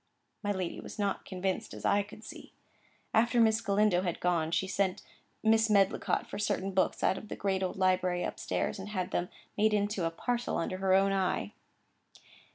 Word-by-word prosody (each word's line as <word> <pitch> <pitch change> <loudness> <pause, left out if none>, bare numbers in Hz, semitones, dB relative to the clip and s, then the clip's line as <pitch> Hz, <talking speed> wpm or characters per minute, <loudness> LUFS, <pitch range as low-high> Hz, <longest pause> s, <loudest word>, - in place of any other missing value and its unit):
My 205 - -1
lady 185 -3 -3
was - - -9
not 200 -2 -1
convinced, 190 0 -3
as - - -8
I 205 - +4
could 215 +2 -11
see. - - -11 0.6
After 235 +2 +3
Miss 225 0 +4
Galindo 200 -3 +3
had 175 -3 -2
gone, 170 -3 +1
she 170 - +1
sent 190 0 -1 0.4
Mrs. 220 0 +4
Medlicott 200 -2 +2
for - - -7
certain 200 -2 -1
books 190 0 +1
out 190 - +2
of 215 - -12
the - - -5
great 195 -1 -1
old 185 - -1
library 185 -1 +2
up - - -5
stairs, - - -2
and 195 +2 -6
had 185 -4 -3
them 175 +1 -1 0.3
made 215 0 +4
up - - +4
into 205 -3 -1
a - - +2
parcel 240 +8 -2
under 185 +2 -2
her 190 0 +3
own 195 0 +3
eye. 185 - 0
195 Hz, 195 wpm, -31 LUFS, 185-210 Hz, 0.6 s, I